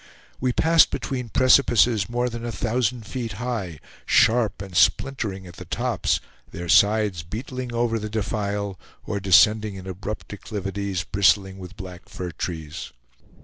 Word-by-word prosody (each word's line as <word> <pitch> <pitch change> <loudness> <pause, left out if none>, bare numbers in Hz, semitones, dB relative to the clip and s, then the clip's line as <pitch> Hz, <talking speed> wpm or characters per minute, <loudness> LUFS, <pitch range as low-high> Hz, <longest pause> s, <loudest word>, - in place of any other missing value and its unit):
We 130 0 +1
passed 165 +5 +5
between 125 -4 -4
precipices 120 -4 +4
more 120 +1 0
than 120 -1 -5
a 120 - -3
thousand 115 0 -1
feet 115 -2 -4
high, 105 - -4 0.3
sharp 115 -3 +3
and 95 -2 -8
splintering 100 -1 +1
at 85 - -12
the - - -9
tops, - - 0 0.3
their 85 +1 -7
sides 105 -1 +4
beetling 125 +8 -6
over 115 -1 0
the 110 0 -5
defile 105 -2 -2 0.3
or 100 - -2
descending 105 +2 +4
in 95 -1 -9
abrupt 100 +3 -6
declivities, 100 -3 -4
bristling 95 -1 +2
with 90 0 -10
black 90 -2 -10
fir 90 -1 -5
trees. 80 -2 -6
105 Hz, 145 wpm, -24 LUFS, 95-120 Hz, 0.3 s, passed